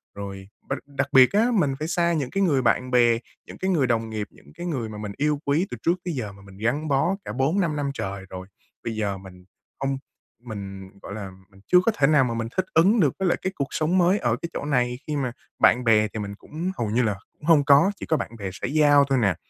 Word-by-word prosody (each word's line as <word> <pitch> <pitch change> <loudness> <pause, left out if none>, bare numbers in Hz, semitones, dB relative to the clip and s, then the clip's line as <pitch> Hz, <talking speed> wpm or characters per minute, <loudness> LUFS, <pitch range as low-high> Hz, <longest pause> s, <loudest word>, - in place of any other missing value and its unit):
Rồi 100 -1 -7 0.2
b - - -9
đặc - - -4
đặc 140 -1 -2
biệt 130 -1 +7
á, 215 +3 +4
mình 145 -10 +2
phải 155 - -2
xa 170 0 +1
những 145 -6 -1
cái 195 - +1
người 145 -8 +3
bạn 125 +2 +1
bè, 120 -2 +4 0.3
những - - -10
cái 190 - -2
người 145 -7 +2
đồng 115 -2 0
nghiệp, 110 -1 -4
những - - -19
cái 175 +2 -6
người 130 -10 -3
mà 105 - -8
mình 105 -1 -5
yêu 150 0 +1
quý 155 +7 +1
từ - - -5
trước 170 - +3
tới 175 - -2
giờ 110 -6 -4
mà 100 - -16
mình 95 -1 -14
gắn 125 +9 -1
bó 155 +7 +2
cả - - -5
4-5 155 +5 +1
năm 145 -1 -1
trời 95 -6 -5
rồi. 95 0 -8 0.4
Bây 115 -1 -3
giờ 100 -3 -2
mình 90 -1 -13 0.4
hông, 135 0 0 0.5
mình, 95 -4 -7
gọi 100 - -8
là, 100 -2 -6 0.2
mình 95 -1 -20
chưa 180 - +6
có 230 - +4
thể 140 - +4
nào 150 -2 +5
mà 120 -2 -1
mình 115 -1 -2
thích 185 - +2
ứng 195 +8 +5
được 150 -8 +3
với 190 - +1
lại 175 - +2
cái 190 - -2
cuộc 140 -1 -2
sống 160 +4 +1
mới 185 +3 +4
ở 120 -2 +1
cái 170 - -3
chỗ - - -4
này 125 -4 0
khi 150 - -2
mà 130 -3 -1 0.3
bạn 125 - +5
bè 110 -2 +4
thì 110 - -4
mình 100 -1 -5
cũng 165 - -5
hầu 115 -3 -1
như 120 +4 +2
là 105 -3 0 0.2
cũng - - -30
hông 155 -4 +5
có, 145 +6 +6
chỉ - - -6
có 160 - +1
bạn - - -4
bè 100 -2 -4
xã 95 - -4
giao 145 0 +5
thôi 135 - +3
nè. 100 -5 +2
135 Hz, 270 wpm, -24 LUFS, 110-155 Hz, 0.5 s, biệt